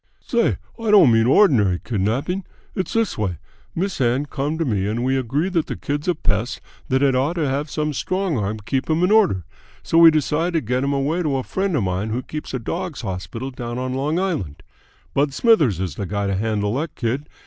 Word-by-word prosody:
"Say, 235 -3 +1 0.2
I 225 -1 -2
don't 195 - +7
mean 115 0 +4
ordinary 125 - +4
kidnapping. 125 - -1 0.3
It's 185 -3 -3
this 225 - 0
way. 95 -5 -1 0.4
Miss 185 -3 -2
Ann 125 +4 +2
come 145 +2 -3
to 165 - 0
me 100 -6 0
and 115 +3 -1
we 130 +1 +1
agree 135 +6 0
that 170 -4 0
the - - -4
kid's 145 +2 -3
a 180 - +2
pest 115 -4 -1 0.3
that 130 +2 +2
had 135 -1 +4
ought 135 +6 +1
to 160 -4 0
have 140 +3 -2
some 150 0 -2
strong 185 +3 -1
arm 105 -1 -1
keep 135 +4 -1
him 160 +2 +2
in 180 - +3
order, 195 - +3 0.4
so 165 - +3
we 165 -1 +10
decide 155 +3 0
to 165 - +1
get 125 +3 -1
him 140 - 0
away 140 +5 0
to 150 -5 0
a 130 - -2
friend 190 +2 -1
of 125 - +1
mine 95 +3 -1
who 120 +4 -2
keeps 155 +3 -6
a - - +1
dogs' 165 +7 -4
hospital 100 +5 -5
down 120 -1 -5
on 130 0 -2
Long 145 +5 -1
Island. 160 - -2 0.5
Bud 140 0 +1
Smithers 155 - +3
is 95 -5 -2
the 100 +6 -5
guy 100 +1 -2
to 100 - 0
handle 105 0 -1
that 155 +3 -4
kid. 130 +6 -2
135 Hz, 220 wpm, -21 LUFS, 110-165 Hz, 0.5 s, we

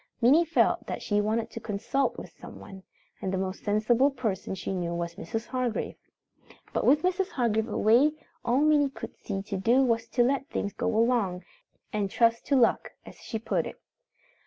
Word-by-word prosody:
Minnie 280 +8 +5
felt 330 - +2
that - - -4
she 205 -1 +1
wanted 220 +2 -1
to - - -6
consult 225 +5 -1
with - - -8
someone, 195 -1 -11 0.4
and 190 - -2
the 190 - -1
most 190 +1 -4
sensible 225 +6 +3
person 220 -8 -3
she 190 +1 -4
knew 175 -2 -2
was 170 0 -3
Mrs. 225 +4 -5
Hargrave. 250 -3 -2 0.8
But - - 0
with 295 +4 +5
Mrs. 365 +1 +1
Hargrave 225 -3 0
away, 240 +8 +4 0.3
all 245 +4 +2
Minnie 300 -2 +4
could 270 - -9
see 195 -2 -5
to 200 -1 -4
do 235 +8 +3
was 230 -2 +1
to 245 - +2
let 275 +4 0
things 200 -10 -3
go - - -2
along, 225 -5 +1 0.5
and 205 -2 0
"trust 230 +2 +2
to 280 - +3
luck" 245 -3 +2
as - - -12
she 225 - -5
put 220 - -1
it. - - -10
230 Hz, 185 wpm, -28 LUFS, 200-260 Hz, 0.8 s, Minnie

